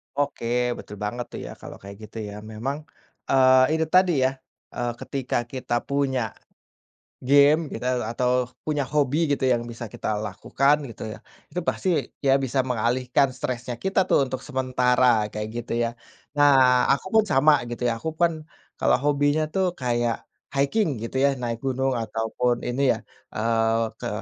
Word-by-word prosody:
Oke, 140 -4 -2 0.3
betul 105 - -9
banget 120 +4 -3
tuh - - -6
ya, - - -7
kalau - - -9
kayak 100 0 -10
gitu 115 - -12
ya, 100 - -8 0.2
memang, 130 +7 -3 0.5
eee, 130 +2 +5
itu 160 - +1
tadi 185 -1 +6
ya, 130 - +3 0.4
eee, 120 0 -1
ketika 135 -3 -2
kita 120 -1 -3
punya 140 -2 0 1.0
game 145 +3 +5
kita 125 -2 -1
atau 125 +1 +1 0.2
punya 150 -2 -1
hobi 150 +3 +1
gitu 140 - 0
yang 120 -1 +2
bisa 120 +1 -7
kita - - -4 0.2
lakukan, 140 +2 +1
gitu 115 - -9
ya. - - -10 0.3
Itu 180 +4 -3
pasti, 190 - -1 0.3
ya 135 -2 +4
bisa 130 +1 -1
mengalihkan 125 +2 +1
stresnya 125 -1 -4
kita 190 0 +1
tuh - - +5
untuk 130 - -4
sementara 125 -4 +2
kayak, 105 0 -4
gitu 120 0 -4
ya. 115 - 0 0.5
Nah, 130 -3 +5
aku 140 - +1
pun 215 - +4
sama 145 0 +4
gitu 120 +1 -2
ya. 115 - +1
Aku 160 - -3
pun 165 -3 +1 0.4
kalau - - +4
hobinya 145 +1 +2
tuh 190 +2 0
kayak, 120 -3 -1 0.3
hiking 140 - +1
gitu 125 +3 -3
ya, 140 0 +3
naik 120 -2 -3
gunung 135 0 0
ataupun 115 +2 -1
ini 130 +3 0
ya, - - -10 0.3
eee, 115 0 +1
ke - - -4
130 Hz, 160 wpm, -24 LUFS, 120-140 Hz, 1.0 s, tadi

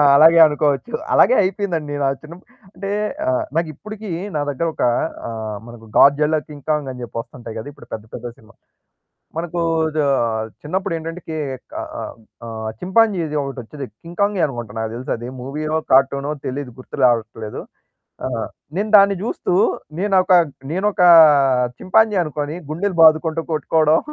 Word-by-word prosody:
అలాగే 160 +3 +7
అనుకోవచ్చు. 150 - 0 0.2
అలాగే 255 - +6
అయిపోయిందండి. 180 -6 -2
నచ్చిన 140 +3 -2 0.4
అంటే 195 +2 -5 0.4
ఆ! - - +3 0.3
నాకిప్పడికి 205 +7 -4 0.3
నా 150 - 0
దగ్గర 145 +4 -1
ఒక - - -3 0.4
ఆ! - - -5 0.4
మనకు 120 -1 -12
గాడ్జిల్లా 150 +3 +5
కింగ్ 145 -3 -12
కాంగ్ 150 -3 0
అని 125 -1 -9
చెప్పి 115 - -8
వస్తుంటాయి 120 -1 -10
గదా! 110 +5 -6
ఇప్పుడు 145 - -16
పెద్ద, 110 -1 -6
పెద్ద 120 0 -6
సినిమా 110 +1 -20 0.9
మనకు 170 +1 -3 0.4
దా 150 - +2 0.6
చిన్నప్పుడెంటంటే 165 0 -3
కే 160 -1 -3 0.4
ఆ! - - -3 0.6
ఆ! - - -7 0.3
చింపాంజీ‌ది 185 -6 +1
ఒకటి 135 -1 -6
వచ్చేది 135 +4 -8 0.2
కింగ్ 170 +1 -11
కాంగే 200 -3 +2
అనుకుంట 120 -6 -7
నాకు 110 0 -3
తెలుసది. 120 -1 -4
మూవీయో, 155 +4 -2
కార్టూనో 140 +2 +3
తెలీదు 130 -1 -4
గుర్తు 130 - -10
రావట్లేదు. 115 -2 -2 0.6
ఆ! - - 0 0.5
నేను 205 +3 -1
దాన్ని 200 0 +5
జుస్తూ 220 - -2 0.5
నేనోక 190 -2 +3 0.4
నేనోక 195 +4 -1 0.8
చింపాంజీ 215 +2 +3
అనుకోని 150 0 -4
గుండెలు 180 +3 -2
బాదుకుంటూ 160 +1 +4
కొట్టుకోవడం, 155 +1 +3
155 Hz, 135 wpm, -20 LUFS, 135-180 Hz, 0.9 s, అలాగే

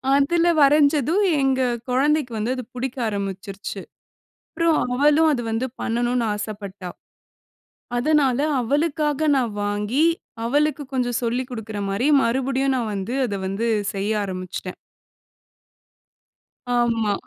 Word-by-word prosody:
அதுல 335 +5 +3
வரைஞ்சதும், 295 - +4 0.2
எங்க 265 -1 +2 0.3
குழந்தைக்கு 280 0 +2
வந்து 220 +4 -1
அது 255 - -5
புடிக்க 255 +1 -4
ஆரம்பிச்சுருச்சு. 195 -1 -5 0.7
அப்பறம் 330 -1 +2 0.2
அவளும் 300 +4 +4
அது 240 -3 -1
வந்து 225 +3 -1
பண்ணனும்ன்னு 240 0 0
ஆசப்பட்டா. 200 -3 -6 1.1
அதுனால 270 -1 +2 0.2
அவளுக்காக 295 +3 0
நான் 245 -5 0
வாங்கி, 210 +8 0 0.4
அவளுக்கு 295 +3 +1
கொஞ்சம் 245 -2 0
சொல்லிக் 245 +2 -1
குடுக்குற 220 -3 -5
மாரி, 230 +8 0
மறுபடியும் 265 +2 +1
நான் 230 -3 -2
வந்து 200 +5 -3
அத 205 - -3
வந்து 210 +5 -1 0.3
செய்ய 200 +2 -1
ஆரம்பிச்சுட்டேன். 185 -1 -6 2.0
ஆமா. 230 -3 +1
245 Hz, 110 wpm, -22 LUFS, 210-285 Hz, 2.0 s, வரைஞ்சதும்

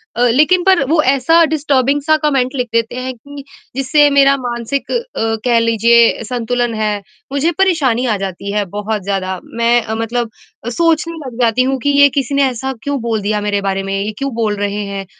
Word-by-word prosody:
अ, 240 - -1
लेकिन 305 +9 +3
पर 375 -5 +4
वो 315 0 +3
ऐसा 325 +5 +3
डिस्टर्बिंग 280 -1 +1
सा 310 +2 +3
कमेंट 270 -3 0
लिख 250 -2 -1
देते 230 0 0
हैं, 255 +1 -4
कि 285 +3 -11 0.3
जिससे 290 +2 +3
मेरा 275 0 +4
मानसिक 245 +2 -4
अ, - - 0 0.5
कह 235 -2 +3
लीजिए 230 +1 +3
संतुलन 245 -1 -1
है, 215 -1 0 0.4
मुझे 280 +4 +1
परेशानी 285 -11 +2
आ 220 -4 +1
जाती 195 +1 -5
है 210 - +1
बहुत 210 -1 -3
ज़्यादा। 190 -2 -3
मैं 235 +1 +1
अ, 220 0 -4
मतलब 225 +1 -2 0.4
अ, - - -2
सोचने 330 +4 0
लग 245 -1 -9
जाती 235 +1 +3
हूँ 270 - -1
कि 285 - +1
ये 285 - +7
किसी 275 +1 -3
ने 280 - +3
ऐसा 265 +2 -4
क्यों 285 -1 -2
बोल 225 -2 -2
दिया 210 +1 -1
मेरे 205 -1 -1
बारे 195 0 -1
में, 195 0 -4
ये 205 +2 -2
क्यों 275 +1 -3
बोल 220 -3 0
रहे 205 0 -2
हैं? 200 -1 -5
245 Hz, 200 wpm, -16 LUFS, 220-280 Hz, 0.5 s, ये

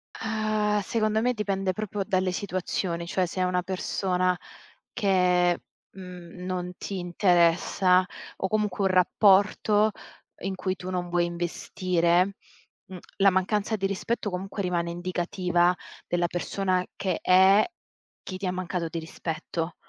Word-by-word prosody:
Ah, 215 -1 0
secondo 215 +1 0
me 250 +1 +2
dipende 195 -3 -1
proprio 205 0 -3
dalle 185 -2 0
situazioni, 180 -2 -2
cioè 185 +1 +1
se 180 +2 -4
è - - +3
una 180 0 +1
persona 185 0 0 0.5
che, 180 -5 +2 0.3
mhmm, 180 -1 -10
non 180 -1 -3
ti 195 -2 -5
interessa 180 +1 +3 0.3
o 190 - -1
comunque 210 -1 0
un 190 - +3
rapporto 205 +3 +4 0.5
in 195 0 -3
cui 185 0 -2
tu 185 +1 -7
non 180 -1 -2
vuoi 175 0 +2
investire, 175 +1 0 0.5
mhmm, 185 - -9 0.2
la 195 0 +6
mancanza 200 +3 0
di 195 - -2
rispetto 200 +3 -2
comunque 195 +2 -4
rimane 175 -2 -1
indicativa 175 0 +1 0.3
della 175 0 +1
persona 185 +1 -1
che 185 -4 -2
è, 190 +3 +6 0.6
chi 185 - -6
ti 190 - -5
ha - - 0
mancato 180 -2 -3
di 165 - -4
rispetto. 165 +1 -4
185 Hz, 135 wpm, -26 LUFS, 175-195 Hz, 0.6 s, la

